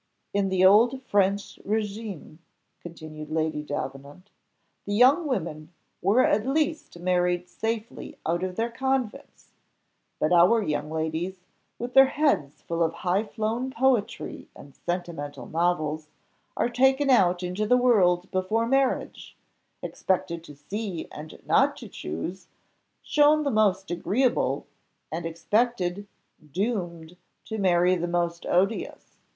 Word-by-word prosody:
"In 200 -1 +1
the 185 0 +3
old 235 +7 +5
French 200 -2 0
régime," 210 -6 -4 0.4
continued 155 -3 -9
Lady 155 -1 -1
Davenant, 145 +5 -7 0.6
"the 205 - -1
young 270 +8 +5
women 160 - -3 0.3
were 210 +8 +4
at 210 +1 +2
least 305 - -1
married 180 0 0
safely 225 +4 -5
out 170 +2 0
of 185 -1 -3
their 230 +3 -1
convents; 265 0 -3 0.7
but 155 - +2
our 180 +7 +6
young 150 -2 -2
ladies, 160 +4 -3 0.4
with 245 +1 -5
their 270 0 +8
heads 275 - 0
full 170 0 -3
of 165 0 +1
high 185 +4 +2
flown 225 +3 -2
poetry 260 -4 0
and 140 - -13
sentimental 170 -5 -5
novels, 155 -2 -1 0.5
are - - +2
taken 265 +3 +3
out 180 -6 +4
into 180 +4 -2
the 250 - +5
world 185 -8 +3
before 195 +5 0
marriage, 270 +2 -1 0.5
expected 170 -3 -2
to 145 - -12
see 190 +4 -5
and 155 +1 -10
not - - +3
to - - -9
choose, 170 - -6 0.6
shown 300 +1 +4
the 280 - 0
most 195 -4 +2
agreeable, 235 +8 0 0.5
and 165 +1 -3
expected, 200 +2 -1 0.4
doomed 180 - -3 0.3
to 220 -1 -5
marry 180 -1 +3
the 175 0 -2
most 170 -1 -2
odious. 195 +5 -1
185 Hz, 125 wpm, -26 LUFS, 170-230 Hz, 0.7 s, their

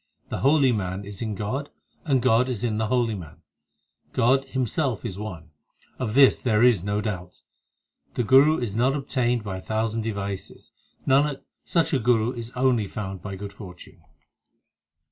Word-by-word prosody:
The - - -3
holy 140 -1 +4
man 95 -2 -3
is 100 -1 -7
in 110 -3 -2
God 130 +9 -3 0.4
and 135 -5 +2
God 125 0 +3
in 115 -2 -2
the 110 - 0
holy 120 -1 +1
man, 80 -6 -10 0.7
God 130 +2 +3
Himself 130 -1 -1
is 95 0 -5
one; 85 -7 -7 0.5
of 120 -3 -2
this 135 -1 +6
there 110 -2 +2
is 120 -8 +4
no 100 +1 -1
doubt. 90 -4 -6 0.7
The 120 - +1
Guru 135 +8 +6
is 115 -5 -3
not 130 +4 +2
obtained 125 -4 0
by 95 -3 -4
a - - -8
thousand 110 +2 -1
devices; 100 -3 -5 0.3
Nanak, 140 +1 +2 0.2
such 165 -1 0
a 135 - +3
Guru 115 -1 +2
is 120 -2 -7
only 125 -5 +2
found 95 -2 -6
by 100 +1 -6
good 100 +1 -7
fortune. 90 -3 -12
115 Hz, 165 wpm, -25 LUFS, 100-130 Hz, 0.7 s, this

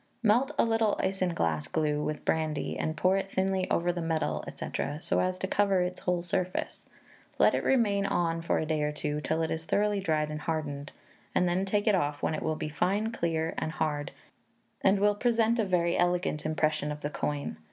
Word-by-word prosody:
Melt 240 +6 +3
a - - +4
little 225 -2 +1
isinglass 170 - 0
glue 150 -1 0
with 150 0 -4
brandy, 155 -2 0
and 155 0 -2
pour 185 +4 +3
it 195 0 -3
thinly 190 0 0
over 175 +1 +1
the 175 - -3
medal, 160 -2 -1
&c., - - -5 0.3
so - - 0
as 185 0 0
to 190 - -2
cover 195 -1 +2
its 180 0 -2
whole 180 -1 -1
surface; 180 +1 -2 0.6
let - - +5
it - - 0
remain 205 -6 +2
on 165 -3 0
for 165 - +1
a - - 0
day 155 -1 0
or 150 0 +1
two, 150 0 -3
till 160 +2 0
it 160 - -2
has 160 0 -3
thoroughly 205 +2 +1
dried 155 -5 0
and 150 0 -5
hardened, 145 -3 -3 0.4
and 180 - +3
then 180 +2 +1
take 205 +1 0
it 215 - +4
off, 145 -6 0
when - - +1
it 155 - -3
will 160 0 -1
be 155 - -4
fine, 195 +8 0
clear, 165 -6 -1
and 160 - -3
hard, 150 -2 -1 0.7
and 195 +1 +4
will 205 +1 +4
present 230 +1 +2
a 220 - +2
very 175 -2 +1
elegant 175 -4 0
impression 155 -1 0
of 150 0 -6
the 145 - -2
coin. 145 - -3
170 Hz, 205 wpm, -29 LUFS, 155-195 Hz, 0.7 s, let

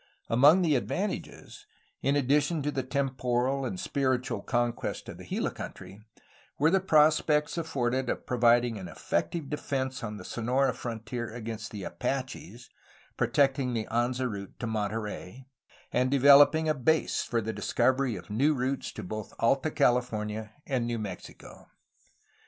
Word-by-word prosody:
Among 145 +10 +6
the 160 -3 +3
advantages, 185 - -3 0.3
in 140 - +2
addition 145 +3 +2
to 150 - 0
the 135 - -1
temporal 130 0 -1
and 185 - -4
spiritual 130 -6 -1
conquest 120 -1 -2
of - - -9
the - - -9
Gila - - -1
country, 100 - -9 0.6
were 155 +3 +3
the 190 - +4
prospects 150 -3 +3
afforded 130 -6 -1
of - - -3
providing 120 -2 +3
an 95 - -7
effective 145 - -2
defence 130 -3 -3
on 105 -1 -4
the 90 - -10
Sonora 125 +4 0
frontier 120 0 -5
against 110 -2 -6
the 105 -3 -7
Apaches, 125 -3 -5 0.4
protecting 135 -3 +1
the 110 -1 -1
Anza 125 +2 0
route 100 -4 -7
to - - -3
Monterey, 110 +1 -4 0.5
and 125 +1 +2
developing 140 +3 +6
a 155 - +3
base 155 +3 +1
for 120 - -1
the 110 0 -3
discovery 130 -3 +1
of - - -9
new 140 +8 +2
routes 130 +1 -2
to - - -7
both 110 +3 -6
Alta 135 +6 +2
California 110 -5 0
and 125 -4 -1
New 120 -1 -1
Mexico. 100 -5 -9
125 Hz, 145 wpm, -29 LUFS, 115-140 Hz, 0.6 s, Among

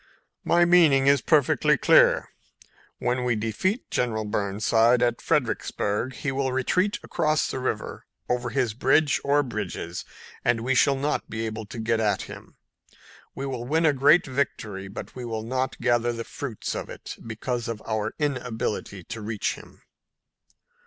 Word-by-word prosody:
"My 175 0 +4
meaning 160 -6 +5
is 140 -1 +5
perfectly 150 -5 +3
clear. - - +5 0.7
When 125 +1 -1
we 120 -2 +1
defeat 115 - -2
General 110 -3 0
Burnside 110 +3 +2
at 120 -1 0
Fredericksburg 105 +6 -1
he 145 - -2
will 135 -1 -1
retreat 180 +10 +1
across 155 0 +1
the - - -3
river 115 -4 -4 0.2
over 125 0 -1
his 125 -3 0
bridge 135 +5 +2
or 145 +1 +3
bridges 100 -7 -5 0.4
and 120 -1 +2
we 130 +3 0
shall 140 +2 +4
not 140 +2 -2
be 110 +1 -3
able 110 -1 -5
to 110 - -9
get 115 0 0
at 105 -2 +1
him. - - -11 0.8
We 135 - -4
will 130 -3 -4
win 160 +4 +2
a 150 - +5
great 145 +5 +5
victory, 110 -8 -3
but 100 - -8
we 125 - -6
will 110 -2 -4
not 130 +3 -2
gather 120 0 +2
the 115 -1 -4
fruits 120 -2 -5
of - - -5
it, - - -8
because 115 +2 -4
of 115 -2 -5
our 110 -1 -2
inability 125 - -3
to 110 - -7
reach 105 -1 -2
him." - - -15
120 Hz, 160 wpm, -25 LUFS, 110-140 Hz, 0.8 s, meaning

